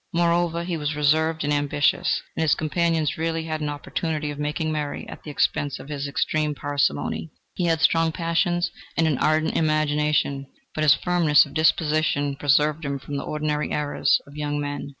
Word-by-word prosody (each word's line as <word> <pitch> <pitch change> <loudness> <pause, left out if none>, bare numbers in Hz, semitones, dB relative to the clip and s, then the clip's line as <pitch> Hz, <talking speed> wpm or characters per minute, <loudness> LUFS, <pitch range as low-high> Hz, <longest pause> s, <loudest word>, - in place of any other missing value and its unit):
Moreover, 170 0 +1
he 170 -1 -3
was 150 0 -2
reserved 160 +2 +2
and 150 0 0
ambitious, 145 0 +1
and - - -2
his 160 -2 +3
companions 160 -1 0
rarely 165 0 -1
had 155 -1 -4
an 150 - -1
opportunity 150 +1 -3
of 145 - -8
making 150 +2 -2
merry 150 -2 -4
at - - -10
the - - -9
expense 145 0 0
of 140 - -11
his 145 -1 -3
extreme 150 +1 -1
parsimony. 145 +3 -1 0.2
He 180 - -1
had 165 -1 +1
strong 165 0 +3
passions 175 +1 0 0.3
and 165 - +3
an 150 -5 +1
ardent 155 +1 +1
imagination, 150 -3 +1 0.3
but 155 - -1
his 145 -4 +6
firmness 165 -5 +4
of - - -13
disposition 155 -3 +1
preserved 150 +3 +2
him 140 -1 -2
from 140 +2 -6
the - - -3
ordinary 150 0 -2
errors 150 -1 +1
of 140 - -15
young 145 -1 -2
men. 145 0 -4
150 Hz, 180 wpm, -24 LUFS, 145-160 Hz, 0.3 s, his